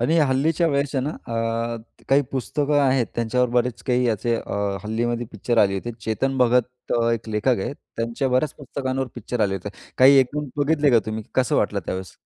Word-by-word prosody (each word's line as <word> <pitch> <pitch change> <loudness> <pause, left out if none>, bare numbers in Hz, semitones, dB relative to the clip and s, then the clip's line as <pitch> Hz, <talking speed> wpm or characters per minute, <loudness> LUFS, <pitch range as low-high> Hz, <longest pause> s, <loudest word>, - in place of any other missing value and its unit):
आणि 155 +8 +2
हल्लीच्या 150 +3 +2
वयाच्या 140 -2 0
ना, 140 +4 -2
अ, 120 - -9 0.8
काही 140 +1 +5
पुस्तकं 145 +3 0
आहेत 130 -3 +2
त्यांच्यावर 120 +2 +1
बरेच 125 0 0
काही 125 0 +2
याचे 115 +1 0
अ, - - -6 0.3
हल्लीमध्ये 120 +2 -1
पिक्चर 115 +3 -1
आली 100 -2 +4
होती. 120 +5 -4
चेतन 120 +6 -1
भगत 125 0 +1 0.2
एक 115 -1 -3
लेखक 110 +3 +1
आहेत, 95 - -3 0.2
त्यांच्या 115 +4 -1
बऱ्याच 130 +4 +1
पुस्तकांवर 135 -2 -3
पिक्चर 120 0 -4
आले 100 -2 +2
होते. 95 +1 -5 0.3
काही 135 +2 +8
एकून 140 +2 0
बघितले 145 0 +2
का 120 - +6
तुम्ही 110 0 -3
कसं 130 -3 +2
वाटलं 100 -1 +1
त्यावेळेस? 95 -1 -4
125 Hz, 175 wpm, -23 LUFS, 115-135 Hz, 0.8 s, काही